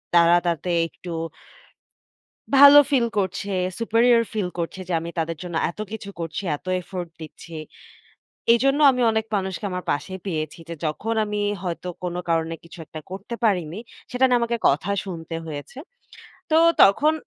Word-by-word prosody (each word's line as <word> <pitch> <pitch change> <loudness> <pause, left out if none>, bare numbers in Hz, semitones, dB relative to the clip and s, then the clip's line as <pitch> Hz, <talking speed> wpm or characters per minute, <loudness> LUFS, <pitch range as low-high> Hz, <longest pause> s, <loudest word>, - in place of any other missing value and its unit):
তারা 170 0 +6
তাতে 170 +1 -1 0.2
একটু 175 +1 -10 1.4
ভালো 285 +1 +10
ফিল 250 -4 +3
করছে, 200 +1 -1 0.3
superior 230 +1 +4
ফিল 205 -5 -1
করছে 170 +3 -4
যে, 175 - -1
আমি 165 - -6
তাদের 165 0 -2
জন্য 175 -2 -6
এত 175 - -11
কিছু 215 -2 -6
করছি, 165 +2 -4 0.2
এত - - -34 0.2
এফোর্ট 180 -1 -6
দিচ্ছি। 160 +1 -10 1.0
এজন্য 275 +5 +3
আমি 250 -1 0
অনেক 220 0 0
মানুষকে 190 +1 -3
আমার 180 0 -4
পাশে 150 +6 -4
পেয়েছি 155 -4 -3
যে, 170 - -5
যখন 215 +9 -2
আমি 210 0 -3 0.2
হয়তো 180 0 -4 0.2
কোন 175 - -2
কারণে 165 0 0
কিছু 170 +1 -13
একটা 155 - -8
করতে 195 +5 -6
পারিনি, 180 -4 +1 0.3
সেটা 250 +1 +2
নিয়ে 245 - +4
আমাকে 235 0 0
কথা 155 +8 0
শুনতে 165 -3 -6
হয়েছে। 150 - -7 0.7
তো 315 - +4 0.3
তখন 290 +11 +5
185 Hz, 155 wpm, -23 LUFS, 165-225 Hz, 1.4 s, ভালো